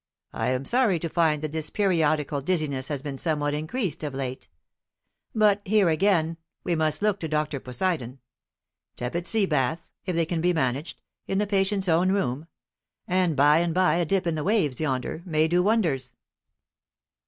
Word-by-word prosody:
"I - - -2
am 130 +1 -1
sorry 235 - +2
to 165 - -3
find 155 -3 +1
that 155 - -3
this 155 -1 -3
periodical 155 -7 +1
dizziness 140 -5 -1
has 145 -2 -4
been 140 -3 -5
somewhat 150 -3 0
increased 160 - -3
of 145 -3 -4
late. 130 -1 -5 0.9
But 210 -2 +4
here 200 -2 +3
again 165 -1 +2 0.3
we 175 - 0
must 155 +3 -1
look 210 -2 +2
to 160 - -3
Dr. 150 -2 -1
Poseidon. 130 0 -2 0.8
Tepid 170 +9 -3
sea 220 -3 +3
baths, 155 +1 -1 0.2
if 180 - -1
they 165 0 +2
can 165 0 -2
be 180 +1 +2
managed, 140 +1 -2 0.2
in 195 - -1
the 210 - +2
patient's 195 -1 +1
own 175 +3 +3
room; 150 -6 -1 0.6
and 180 -3 +1
by 145 +3 +5
and 170 -1 0
by 185 -2 +3
a 175 - +1
dip 190 +2 0
in 170 - 0
the 155 -1 -2
waves 170 - +1
yonder, 135 +1 -2
may 160 -3 +1
do 175 +2 +2
wonders." 175 - 0
160 Hz, 175 wpm, -26 LUFS, 145-185 Hz, 0.9 s, by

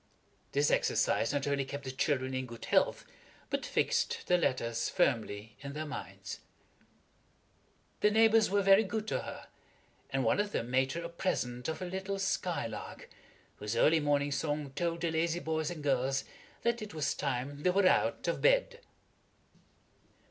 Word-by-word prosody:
This 145 +1 +3
exercise - - +2
not 145 -1 -1
only 140 -1 +1
kept 140 +1 -6
the 130 - -4
children 130 -1 0
in 130 0 -2
good 115 -1 -9
health, - - +2 0.5
but - - -1
fixed - - 0
the 180 - +3
letters 120 -8 0
firmly 110 - 0
in 140 0 -7
their 155 +1 -4
minds. 145 -2 -7 1.6
The 210 - +4
neighbors 220 0 +5
were 200 +1 +2
very 195 +2 +7
good 215 +1 -3
to - - 0
her, - - -8 0.6
and 135 0 0
one 115 - +3
of 205 0 -1
them 120 +2 -2
made 130 +1 +2
her 170 +1 -4
a - - -3
present 125 -9 -2
of 160 +3 -3
a - - -2
little 190 +2 -3
skylark, 170 - -3 0.5
whose 105 +2 -3
early 160 +7 +5
morning 145 -1 +1
song 145 -1 -2
told 170 +3 -2
the 170 -1 0
lazy 165 +1 0
boys 160 -2 -1
and 165 -4 -6
girls 135 -1 +1 0.4
that 235 0 +1
it 210 -6 -7
was 155 - 0
time 140 +1 -3
they 180 - +3
were 195 +2 +3
out - - +2
of - - -1
bed. - - +3
150 Hz, 165 wpm, -32 LUFS, 135-185 Hz, 1.6 s, very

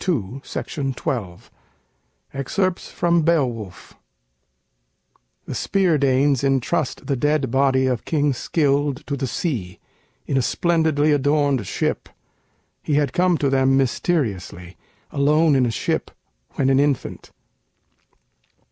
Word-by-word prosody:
[Illustration: 135 - -3
Signature: 95 -9 -4 0.8
"Robert 135 -1 -5
Sharp"] 185 -2 0
FROM 170 -1 0
'BEOWULF' 125 - -1 1.5
[The - - -6
Spear 185 -6 +1
Danes 135 0 +2
intrust 135 +1 0
the 140 - 0
dead 145 -1 0
body 135 0 +2
of 125 -3 -1
King 145 -3 +1
Scyld 140 0 0
to 140 - -3
the 135 -1 -3
sea, 115 - -3 0.5
in 135 - -1
a - - +3
splendidly 160 0 +1
adorned 145 -5 +1
ship. - - -2 0.7
He 150 - -1
had 145 -3 +1
come 180 -1 +2
to 140 - 0
them 135 0 +3
mysteriously, 110 - -2 0.4
alone 150 +2 +3
in 130 -2 +3
a - - 0
ship, - - -2 0.5
when 135 -1 +2
an 135 - +4
infant. 145 -2 -1
140 Hz, 120 wpm, -22 LUFS, 130-150 Hz, 1.5 s, an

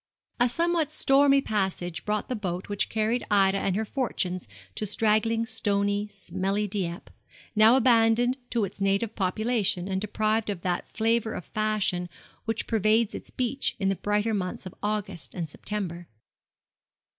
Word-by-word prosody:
A 245 0 +4
somewhat 335 +2 +1
stormy 275 0 +4
passage 190 -6 -2
brought 210 0 -1
the 255 - -2
boat 185 -3 -4
which 205 0 0
carried 220 +2 0
Ida 195 -1 +4
and 190 -2 0
her 220 +2 0
fortunes 185 - -2 0.3
to 210 - -3
straggling, 225 +2 +2
stony, 205 -2 0
smelly 195 +1 -2
Dieppe, 185 -2 -4 0.4
now 220 +3 +7
abandoned 240 0 +4
to 230 -4 +1
its 195 +1 -10
native 200 +3 +1
population, 200 -1 0
and 190 -1 -1
deprived 215 +1 0
of 195 -4 -3
that 180 -1 -1
flavour 225 0 0
of 180 - -6
fashion 215 -5 -1 0.4
which 225 -1 -1
pervades 220 0 +2
its - - -7
beach 255 +2 -1
in 195 - +1
the 195 - +1
brighter 210 +3 0
months 185 -1 -3
of 185 - -7
August 200 -8 -3
and 170 -3 -3
September. 175 0 -5
210 Hz, 150 wpm, -27 LUFS, 190-225 Hz, 0.4 s, now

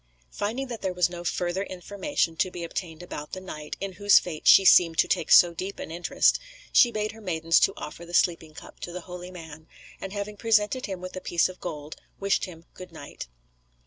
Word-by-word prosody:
Finding 235 +7 -3
that 235 -4 -7
there 185 -1 -2
was 180 -1 +2
no 175 -1 -7
further 175 +1 -1
information 195 - -2
to 185 - +1
be 175 -1 -7
obtained 170 -1 -6
about 150 -4 -8
the 185 - -4
knight, 150 -5 -8
in 195 0 -4
whose 205 +2 +5
fate 160 -4 -2
she 195 - +8
seemed 165 -3 +6
to - - +4
take - - -1
so 175 -1 +8
deep 185 +4 -5
an - - -7
interest, 175 +1 +2 0.3
she 245 - +7
bade 215 -1 -2
her 225 +1 -14
maidens 165 -4 +2
to 195 - +3
offer 165 - -8
the 175 +1 -6
sleeping 160 -3 +1
cup - - -12
to 175 - -6
the 180 +1 -6
holy 180 0 -9
man, 160 -3 -11 0.3
and 195 - -6
having 205 +1 -5
presented 225 +3 +1
him 190 -3 -6
with 185 0 -7
a 185 - -5
piece 170 -2 +1
of 185 - -11
gold, 150 -3 -6 0.2
wished 200 0 +1
him 165 -3 -12
good 185 -1 -11
night. 145 - -9
180 Hz, 215 wpm, -26 LUFS, 165-200 Hz, 0.3 s, she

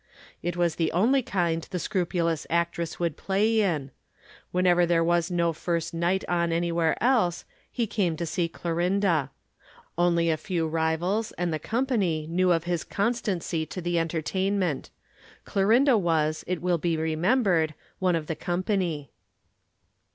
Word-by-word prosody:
It 175 +1 -3
was 170 -2 +1
the 165 -2 +1
only 240 +10 +3
kind 170 -7 0
the 180 - -3
scrupulous 170 -3 -1
actress 170 0 -1
would 170 -3 -1
play 215 +3 +1
in. 155 -9 -1 0.6
Whenever 180 -1 +3
there 170 -1 +3
was 170 0 +1
no 170 -2 +1
first 170 +1 -2
night 175 +3 0
on 170 -1 +1
anywhere 170 -1 +1
else, 225 -9 +2 0.3
he 235 -3 -1
went 170 -5 +2
to 170 - -2
see 165 +1 -1
Clorinda. 170 -3 0 0.7
Only 170 -1 +3
a 155 - 0
few 165 0 -2
rivals 165 +7 0
and 175 -2 -2
the 155 - -2
company 210 - 0
knew 180 +2 +2
of 165 -2 +2
his 175 -1 -1
constancy 200 -7 -1
to 185 - -6
the 175 -1 0
entertainment. 175 0 -1 0.6
Clorinda 235 +7 +4
was, 155 -3 0
it 180 -1 -2
will 180 -2 +1
be 165 0 0
remembered, 160 - +1 0.2
one 185 -2 +2
of 160 -2 -2
the 160 - -3
company. 175 -3 -2
175 Hz, 145 wpm, -26 LUFS, 165-185 Hz, 0.7 s, Clorinda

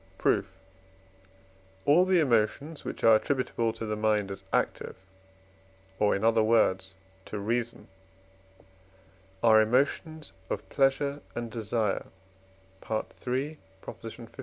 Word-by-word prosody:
Proof. 100 -2 +2 1.4
All 165 +6 +5
the 185 -1 +3
emotions 140 +3 +1
which - - -6
are 115 -1 +7
attributable 120 -2 -1
to 115 - -6
the 105 0 -2
mind 105 -2 +1
as 95 - -8
active, - - -1 1.0
or 105 -1 +3
in 100 - -3
other 115 0 +4
words 95 -4 +2 0.3
to 105 - -6
reason, 115 +3 -2 1.6
are 110 -1 +7
emotions 145 +7 0 0.2
of - - -4
pleasure 140 +1 +1
and 120 -1 -4
desire 110 -2 -1 1.2
(III. 140 +5 -2
115 Hz, 105 wpm, -28 LUFS, 110-140 Hz, 1.6 s, are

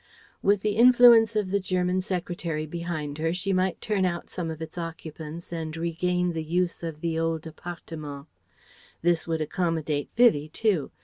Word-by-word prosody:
With 200 0 +3
the 210 0 0
influence 235 -2 +7
of 205 -3 0
the 200 - +2
Government 185 -1 0
Secretary 175 -4 -3
behind 155 -2 -4
her 165 +1 0
she 195 +2 -1
might 185 -1 +1
turn 205 -3 0
out 175 -2 -2
some 170 -2 -3
of 160 -1 -6
its 160 -1 -7
occupants 165 -1 -7
and 160 -1 -4
regain 175 +1 0
the 160 -1 -3
use 175 +2 -1
of 165 -3 -6
the 165 -1 -1
old 165 -1 -1
"appartement." 155 -3 -8 0.8
This 170 -1 +2
would 160 -1 -1
accommodate 155 -3 -1
Vivie 215 -11 +4
too. 185 -5 0
170 Hz, 165 wpm, -26 LUFS, 160-185 Hz, 0.8 s, influence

